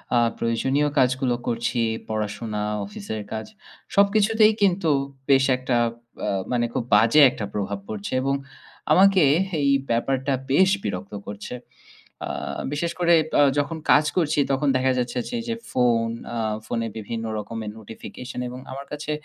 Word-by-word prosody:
আ - - +5 0.2
প্রয়োজনীয় 130 +5 +1
কাজগুলো 130 -1 +2
করছি 120 +1 -1 0.3
পড়াশোনা, 105 0 -3 0.2
অফিসের 105 +2 -6
কাজ 110 0 -4 0.5
সবকিছুতেই 215 +2 +4
কিন্তু 185 -4 +2 0.4
বেশ 135 -1 +5
একটা 130 -1 -1 0.5
আ - - +1 0.2
মানে 120 -1 +1
খুব - - -1
বাজে 115 +8 +6
একটা 110 - -5
প্রভাব 100 -1 -3
পড়ছে 105 +1 -5
এবং 135 +1 +1 0.6
আমাকে 195 -2 +6 0.4
এই 140 - +3 0.2
ব্যাপারটা 135 +3 0 0.2
বেশ 190 +7 +5
বিরক্ত 100 +1 -4
করছে। 100 +4 -7 0.7
আ - - -4 0.4
বিশেষ 165 +3 -1
করে 170 -1 +4 0.3
আ - - +7 0.2
যখন 155 +3 -2
কাজ 150 - +6
করছি 160 -3 +2
তখন 135 +2 +1
দেখা 130 0 +2
যাচ্ছে 125 0 -2
যে - - -8
এইযে 230 0 -3 0.2
ফোন 120 -2 +2 0.3
আ - - -2 0.3
ফোনে 115 +1 -2
বিভিন্ন 115 +1 -5
রকমের 110 +1 -5
নোটিফিকেশন 110 +4 -9
এবং 125 +1 -8
আমার 135 +1 -7
কাছে 150 +1 -4
125 Hz, 145 wpm, -24 LUFS, 110-150 Hz, 0.7 s, আ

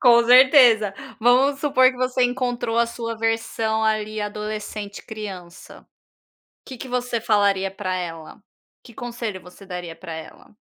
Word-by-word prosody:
Com 235 -1 +6
certeza, 245 -4 +6 0.3
vamos 260 +4 +3
supor 260 -3 +4
que 255 - -12
você 255 0 +1
encontrou 245 -2 -2
a 235 - +3
sua 230 -1 -5
versão 225 0 -1
ali 215 0 -1
adolescente, 210 0 -6
criança, 190 -6 -10 0.8
que 260 - -8
que 255 - -9
você 245 -1 -2
falaria 200 -3 +1
pra 190 -1 -4
ela? 165 0 -7 0.4
Que 240 - -14
conselho 235 -4 -5
você 180 +2 -15
daria 180 -3 -7
para 165 - -9
ela? 160 +5 -11
220 Hz, 140 wpm, -22 LUFS, 200-245 Hz, 0.8 s, Com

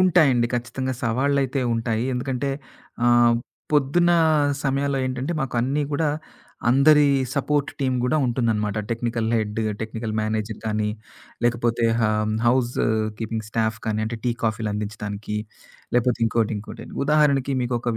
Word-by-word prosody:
ఉంటాయండి. 155 -10 +4
ఖచ్చితంగా 125 +2 -2
సవాళ్ళైతే 135 +3 +1
ఉంటాయి. 115 0 -1
ఎందుకంటే 130 +2 -2 0.6
ఆహ్, 120 -1 +5 0.4
పొద్దున్న 150 +5 +3 0.5
సమయాల్లో 140 0 0
ఏంటంటే 130 +5 -2
మాకు 135 - -4
అన్నీ 140 +5 0
కూడా 150 +2 +1 0.6
అందరి 145 +4 +6 0.3
సపోర్ట్ 145 0 0
టీమ్ 130 -2 +1
గూడా 125 +5 +1
ఉంటుందన్నమాట. 115 -4 0
టెక్నికల్ 115 0 -1
హెడ్, 105 0 -2 0.2
టెక్నికల్ 110 0 -4
మేనేజర్ 110 0 -2
కానీ, 105 -1 0 0.6
లేకపోతే 120 0 +1
హ - - +1 0.4
హౌస్ 120 0 +3 0.5
కీపింగ్ 110 -1 -3
స్టాఫ్ 110 -1 0
కానీ 110 0 0
అంటే 115 +2 -3
టీ 125 - +2
కాఫీలు 110 -1 -1
అందించడాానికి 105 0 -4 0.6
లేకపోతే 125 -1 +2
ఇంకోటి 115 -1 +1
ఇంకోటి. 105 - -8 0.2
ఉదాహరణకి 140 -2 +3
మీకు 120 0 -1
ఒకక 120 0 -2
120 Hz, 125 wpm, -23 LUFS, 110-135 Hz, 0.6 s, అందరి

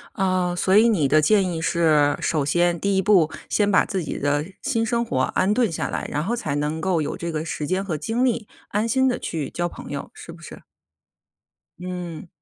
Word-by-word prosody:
呃， 185 -2 0
所 190 +2 +2
以 225 +2 +6
你 175 -11 +2
的 155 +2 +5
建 190 +4 +3
议 165 - -3
是， 155 -4 +3
首 155 -3 0
先 175 +3 +2
第 200 -1 +1
1 190 - +2
步 185 -6 +4 0.2
先 205 -1 +2
把 195 - +4
自 195 -5 -3
己 155 - -5
的 145 +1 0 0.2
新 230 -5 0
生 235 +1 0
活 130 - -2
安 185 +9 +1
顿 240 -6 +2
下 160 - -3
来， - - -3
然 150 - -1
后 230 +6 -1
才 155 -12 -3
能 150 +2 -2
够 180 -1 +1
有 - - -4
这 170 - -4
个 155 -1 -3
时 155 -2 -4
间 185 +4 -1
和 170 -6 -2
精 225 - -1
力， 235 -4 0 0.2
安 210 +3 -1
心 260 +3 +3
地 250 -1 0
去 150 -5 -4
交 175 0 -2
朋 - - -10
友， 140 -1 -5
是 165 - -10
不 170 - -14
是？ - - -11 1.2
嗯。 180 -2 -6
175 Hz, 230 characters per minute, -23 LUFS, 155-210 Hz, 1.2 s, 以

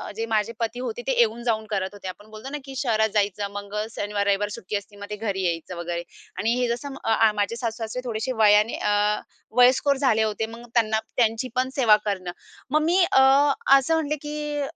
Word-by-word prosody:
जे 225 +1 -2
माझे 225 0 0
पती 230 +1 -2
होते 440 - -4
ते - - +2
येऊन-जाऊन 235 - +1
करत 195 -3 -1
होते. 200 -2 -9
आपण 205 +3 -9
बोलतो 215 +5 -8
ना, 295 - -4
की 270 -1 -9
शहरात 220 -5 +1
जायचं 205 -1 0
मग 200 0 -7 0.2
शनिवार 205 0 -2
रविवार 200 +1 +1
सुट्टी 200 0 -6
असते 205 0 -5
मग 205 - -7
ते 210 - -3
घरी 200 -3 -3
यायचं, 170 +1 -2
वगैरे 170 0 -4 0.3
आणि 225 +2 +1
हे 250 - +1
जसं 255 +4 -4
अ, 225 0 +3
माझे 205 +2 -1
सासू-सासरे 230 0 -4
थोडेसे 230 +1 -2
वयाने 210 +1 +5
अ, 210 0 +1 0.4
वयस्कर 260 +3 +5
झाले 255 -5 +2
होते. 220 0 -1
मग 230 +2 -10
त्यांना 220 -2 +2 0.2
त्यांची 225 +1 +1
पण 255 +1 +1
सेवा 235 -6 +6
करणं. 185 -4 -2 0.4
मग 305 +2 +3
मी 340 +3 +2
अ, 265 - +6 0.6
असं 275 +4 0
म्हटले, 300 -2 0
की 295 0 -4
220 Hz, 195 wpm, -24 LUFS, 205-250 Hz, 0.6 s, सेवा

